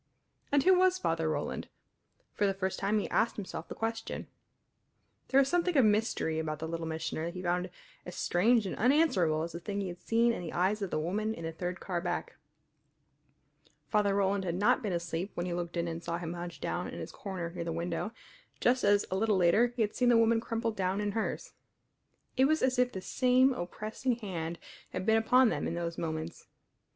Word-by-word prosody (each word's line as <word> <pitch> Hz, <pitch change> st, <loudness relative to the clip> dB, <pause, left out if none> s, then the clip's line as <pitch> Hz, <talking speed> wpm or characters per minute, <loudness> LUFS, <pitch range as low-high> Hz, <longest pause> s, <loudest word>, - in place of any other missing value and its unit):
And 285 Hz, -1 st, +4 dB
who 375 Hz, -, +6 dB
was 370 Hz, 0 st, +4 dB
Father 165 Hz, -, 0 dB
Roland? 155 Hz, -, -3 dB, 0.7 s
For 205 Hz, -, +1 dB
the 195 Hz, -, 0 dB
first 190 Hz, -1 st, -2 dB
time 200 Hz, +2 st, +1 dB
he 210 Hz, -, -1 dB
asked 230 Hz, -, +2 dB
himself 200 Hz, -3 st, -6 dB
the -, -, -7 dB
question. 225 Hz, 0 st, -3 dB, 1.0 s
There 270 Hz, -, +4 dB
was 275 Hz, -, +4 dB
something 350 Hz, 0 st, +1 dB
of 260 Hz, -, +6 dB
mystery 210 Hz, -7 st, +1 dB
about 155 Hz, -1 st, -2 dB
the 160 Hz, +2 st, -5 dB
Little 165 Hz, 0 st, -4 dB
Missioner 160 Hz, 0 st, -3 dB
that 170 Hz, +2 st, -5 dB
he 180 Hz, -, -5 dB
found 180 Hz, +1 st, 0 dB, 0.3 s
as 180 Hz, -, -8 dB
strange 220 Hz, +5 st, +3 dB
and 190 Hz, -, -3 dB
unanswerable 205 Hz, -, +3 dB
as 170 Hz, -, -4 dB
the 170 Hz, -, -6 dB
thing 200 Hz, +4 st, -4 dB
he 195 Hz, -2 st, -2 dB
had 175 Hz, 0 st, -9 dB
seen 235 Hz, +1 st, +3 dB
in -, -, -4 dB
the 170 Hz, -, -6 dB
eyes 195 Hz, +4 st, +1 dB
of 195 Hz, -, -2 dB
the -, -, -1 dB
woman 210 Hz, +8 st, -1 dB
in 165 Hz, -, -8 dB
the 165 Hz, -, -3 dB
third 175 Hz, +2 st, -4 dB
car 175 Hz, -3 st, -3 dB
back. 175 Hz, 0 st, -3 dB, 1.5 s
Father 205 Hz, -2 st, +2 dB
Roland 200 Hz, 0 st, +1 dB
had 175 Hz, -2 st, -2 dB
not 215 Hz, +8 st, +3 dB
been 210 Hz, -5 st, -2 dB
asleep 170 Hz, +2 st, -2 dB
when 175 Hz, -, -2 dB
he 180 Hz, -, -2 dB
looked 175 Hz, 0 st, -4 dB
in 170 Hz, 0 st, 0 dB
and 165 Hz, 0 st, -5 dB
saw 170 Hz, -, -2 dB
him 170 Hz, -1 st, -5 dB
hunched 175 Hz, -4 st, -7 dB
down 180 Hz, -, -2 dB
in -, -, -7 dB
his -, -, -6 dB
corner 185 Hz, -4 st, -5 dB
near 170 Hz, -1 st, -4 dB
the 165 Hz, -, -3 dB
window, 170 Hz, +5 st, -2 dB, 0.5 s
just 250 Hz, +1 st, +2 dB
as 205 Hz, 0 st, +4 dB
a -, -, +1 dB
little 210 Hz, 0 st, +2 dB
later 185 Hz, +7 st, +5 dB
he 230 Hz, -, +2 dB
had 210 Hz, -, -2 dB
seen 250 Hz, -1 st, +2 dB
the 240 Hz, -, +6 dB
woman 230 Hz, 0 st, +4 dB
crumpled 230 Hz, -1 st, -2 dB
down 190 Hz, 0 st, 0 dB
in 205 Hz, 0 st, -1 dB
hers. 220 Hz, +1 st, -3 dB, 0.8 s
It 265 Hz, -, +5 dB
was 310 Hz, +3 st, +2 dB
as 255 Hz, -1 st, +2 dB
if 250 Hz, 0 st, +3 dB
the 190 Hz, -, -5 dB
same 255 Hz, +5 st, +3 dB
oppressing 215 Hz, +5 st, -3 dB
hand 170 Hz, -7 st, -4 dB, 0.4 s
had 185 Hz, -, -3 dB
been 220 Hz, +1 st, +4 dB
upon 250 Hz, +2 st, +5 dB
them -, -, -1 dB
in 165 Hz, -, -3 dB
those 170 Hz, -1 st, -3 dB
moments. 160 Hz, 0 st, -4 dB
190 Hz, 215 wpm, -31 LUFS, 170-225 Hz, 1.5 s, who